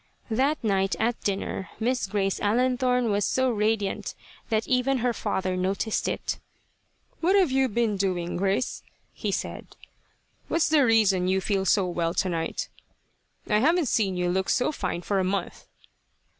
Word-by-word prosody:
That 270 +6 +1
night 195 -3 +1
at 235 +1 0
dinner 195 -2 -3
Miss 245 -1 0
Grace 195 -1 -1
Allenthorne, 250 +2 +2
was 205 0 +1
so 260 +4 +1
radiant 210 -2 -1 0.3
that 220 0 0
even 255 +1 +2
her 245 0 0
father 185 -3 -2
noticed 195 +4 -1
it. - - -3 0.8
"What 365 +4 +3
have 375 -8 +4
you 265 0 +2
been 220 -2 0
doing, 180 -3 -1
Grace?" 195 +6 0 0.3
he - - -3
said. - - -5 0.7
"What's 330 -1 +1
the 305 -2 +5
reason 210 -6 +3
you 190 +1 +2
feel 195 0 -1
so 195 0 +3
well, 170 -1 -1
tonight? 165 -4 -1 0.8
I 210 -1 +3
havn't 325 +2 +3
seen 195 -5 +1
you 180 0 0
look 190 +1 -1
so 250 - +2
fine 175 - -3
for 200 +1 0
a - - +1
month." 190 0 -3
210 Hz, 155 wpm, -26 LUFS, 190-250 Hz, 0.8 s, the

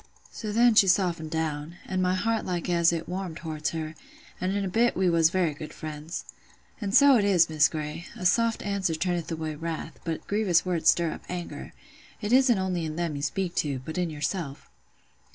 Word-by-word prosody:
So 215 -2 -5
then 235 +2 +5
she 210 -2 +6
softened 175 -4 +1
down; 160 0 -3
and 185 -1 -1
my 185 0 +2
heart 225 +4 0
like 175 -2 -3
as 170 -1 +4
it 165 -1 -3
warmed 180 -3 -4
towards 155 -2 -3
her, 160 -1 -4 0.5
an' 185 - 0
in 200 +1 -1
a - - -1
bit 230 +6 +2
we 185 -2 +3
was 165 -1 +4
very 175 -3 +1
good 150 +1 -8
friends. 155 +2 -6 0.6
An' 200 -2 -2
so 280 +3 +7
it 210 - +2
is, 180 -5 +4
Miss 155 0 +5
Grey, 155 +1 -5
'a 180 - -6
soft 230 +4 +2
answer 195 -5 0
turneth 175 0 -2
away 160 -1 -3
wrath; 160 +1 -5
but 165 -2 -4
grievous 200 -5 +2
words 170 -3 +2
stir 170 -2 +3
up - - -7
anger.' 175 -5 -6 0.5
It 210 +1 -2
isn't 255 -3 +5
only 185 -2 -1
in 155 -1 -4
them 170 -3 -2
you 140 - -4
speak 175 +4 -2
to, 140 -3 0
but 160 +3 -4
in 175 -2 0
yourself." 150 -1 -4
175 Hz, 205 wpm, -27 LUFS, 160-190 Hz, 0.6 s, so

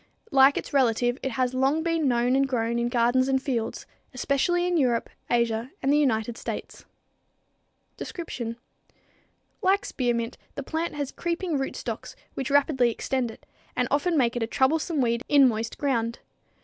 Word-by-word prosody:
Like 270 +1 +6
its - - -5
relative, 245 -2 +2
it 265 - -3
has 255 0 0
long 270 +5 +1
been 330 -3 +1
known 245 0 +2
and 270 0 +2
grown 235 -2 0
in 235 0 0
gardens 245 +2 +2
and 265 -1 +2
fields, 245 -4 -3 0.3
especially 350 +7 +1
in 355 0 +1
Europe, 250 -7 +1 0.2
Asia 235 0 +1
and 275 +1 +3
the - - +4
United 235 -4 0
States. - - -6 1.1
Description. 235 -9 -5 1.0
Like 385 +2 +2
spearmint, 240 -2 -2 0.2
the 280 - -4
plant 320 +4 -3
has 285 -2 -3
creeping 345 -1 -2
rootstocks, 270 - -5 0.2
which 270 - -3
rapidly 275 -3 +3
extend 250 +1 -2
it, 225 - -13 0.3
and 250 - +1
often 315 +4 +2
make 245 -3 +2
it 240 - -2
a 225 - 0
troublesome 300 +5 +1
weed 235 -1 +1
in 280 -2 +7
moist 225 -1 -2
ground. 235 -5 0
260 Hz, 160 wpm, -26 LUFS, 235-285 Hz, 1.1 s, in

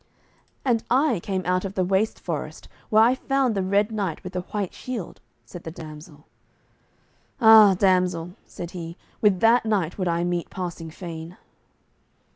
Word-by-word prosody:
"And 235 -4 +1
I 260 - +2
came 190 +1 -3
out 180 +1 +1
of 195 0 -5
the 185 - +1
waste 195 +4 0
forest - - -5 0.2
where 220 0 +6
I 240 +2 +5
found 265 -2 0
the 195 - -1
red 200 +3 +1
knight 200 -7 -3
with 185 - -8
the 180 - -2
white 195 +1 -4
shield," 235 - -7 0.2
said 175 - -10
the - - -6
damsel. 155 -2 -11 1.1
"Ah, 220 -4 +8
damsel," 180 -3 +1
said 170 -1 -8
he, 170 -1 -7 0.2
"with 200 -4 +3
that 230 +2 +5
knight 200 -5 -1
would 185 - 0
I 170 0 0
meet 175 -1 -2
passing 175 -3 -6
fain." 165 0 -8
185 Hz, 160 wpm, -24 LUFS, 170-215 Hz, 1.1 s, Ah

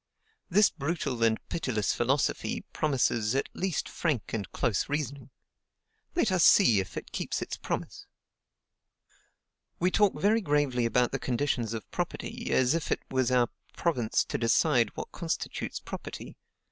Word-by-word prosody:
This 200 +4 +5
brutal 140 -5 -3
and 110 -1 +4
pitiless 120 -10 -1
philosophy 135 +4 0
promises 125 -6 +1
at 135 - +1
least 185 -4 -2
frank 150 -10 -2
and 100 -5 -3
close 115 0 0
reasoning. 140 -3 -3 0.9
Let 235 - +2
us 180 -3 +3
see 120 - +6
if 95 -3 -5
it - - -7
keeps - - -2
its - - -4
promise. - - -5 1.7
"We 180 +2 +2
talk 205 -1 +3
very 220 +3 +3
gravely 145 - +1
about 125 +2 +2
the 135 - -2
conditions 120 -3 -1
of 110 - -6
property,... - - -4
as 130 +2 +3
if 165 -1 -2
it - - 0
was 130 -2 +2
our 125 -2 +3 0.3
province 125 -10 +1
to - - -3
decide 120 0 +3
what - - -6
constitutes 170 -3 -3
property.... - - -8
135 Hz, 145 wpm, -29 LUFS, 115-165 Hz, 1.7 s, see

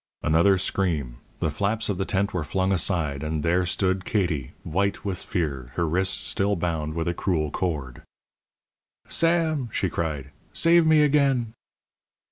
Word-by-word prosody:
Another 85 +5 +4
scream; 80 -10 -1 0.2
the 80 - +1
flaps 105 +8 0
of 100 -3 -2
the 95 - 0
tent 100 0 0
were 90 -4 -1
flung 95 +5 0
aside, 80 -6 0
and 75 -1 -2
there 90 +2 +2
stood 95 +1 0
Katie, 85 - -1
white 100 +5 -1
with 95 -3 -2
fear, 70 -7 -3
her 85 -1 0
wrists 95 +4 +1
still 100 +1 0
bound 80 -3 -2
with 85 +1 -2
a 85 - +1
cruel 80 -5 -1
cord. 75 -10 -3 1.1
"Sam!" 165 -6 +1
she 95 -4 -1
cried, 75 -5 -3 0.2
"save 170 -1 +4
me 155 -1 +6
again!" 135 -6 +2
90 Hz, 150 wpm, -25 LUFS, 80-100 Hz, 1.1 s, me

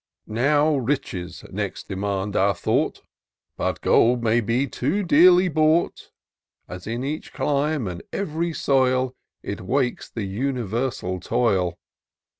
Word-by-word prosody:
" - - -62
Now 145 +6 +2
Riches 100 -9 -3
next 100 -1 -4
demand 100 +1 -3
our 100 0 +3
thought: - - -1 0.5
But - - -2
gold 120 0 +3
may 115 +1 +3
be 115 +5 +1
too 145 +9 -1
dearly 180 +2 +6
bought. 155 0 +1 0.6
As 90 +2 -8
in 120 +3 -3
each 150 +3 -4
clime 145 -3 0
and 90 -1 -5
ev'ry 170 -3 -2
soil. 130 -4 +1 0.3
It - - -5
wakes 125 +6 -1
the 115 - -5
universal 115 -3 -2
toil. 90 -5 0
125 Hz, 125 wpm, -23 LUFS, 100-145 Hz, 0.6 s, dearly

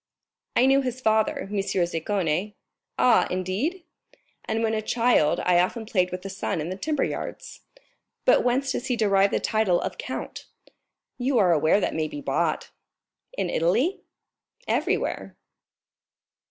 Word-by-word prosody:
"I 245 - +5
knew 270 +1 +4
his 255 -1 -3
father, 220 +5 +1
M. 200 -2 -2
Zaccone." 185 0 -1 0.4
"Ah, 245 -3 +4
indeed?" 200 - -2 0.6
"And 225 +1 -1
when 225 0 +1
a 215 - 0
child 230 -9 +2
I 180 -1 +3
often 220 +6 0
played 185 -4 0
with 180 0 -5
the 195 - -5
son 190 -3 -3
in 155 +3 -3
the 185 - -3
timber 295 +8 -1
yards." - - -5 0.6
"But - - +5
whence 260 +2 +1
does 245 - -3
he 250 - +1
derive 200 -3 +3
the - - 0
title 215 -5 +1
of - - -5
count?" - - -6 0.7
"You 255 +1 +1
are 185 -5 +4
aware 155 +5 +3
that - - -1
may 155 -1 -1
be 295 - -7
bought." 285 - -1 0.7
"In - - -1
Italy?" 235 - +1 0.7
"Everywhere." - - -1
210 Hz, 150 wpm, -25 LUFS, 180-250 Hz, 0.7 s, I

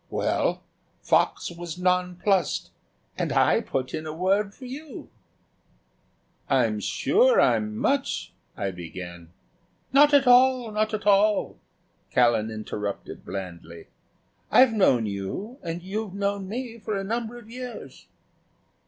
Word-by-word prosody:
Well, - - 0 0.4
Fox - - +1
was 170 -1 -7
nonplussed 180 0 0 0.5
and - - -1
I - - +3
put 130 -1 -3
in 155 0 -4
a 155 - -4
word 195 +4 0
for 265 - -11
you." 280 +4 -9 1.4
"I'm 115 -6 +2
sure 470 - +3
I'm 215 0 +2
much 280 +1 -1
" - - -38
I 100 -4 -2
began. 85 -1 -9 0.6
"Not 290 +2 +7
at 285 -2 +5
all, 250 -1 +5
not 215 +1 0
at 215 - -6
all," 205 +1 +3 0.5
Callan 115 -3 +3
interrupted, 105 -2 -5
blandly. 85 -3 -8 0.6
"I've 255 -3 +6
known 130 - +3
you 105 - -5
and 170 0 -5
you've 200 +1 -4
known 200 -1 -2
me 235 +1 -5
for 210 -1 -3
a 195 - -3
number 230 +3 -3
of 235 -3 -13
years." 250 +1 -9
195 Hz, 125 wpm, -25 LUFS, -, 1.4 s, Not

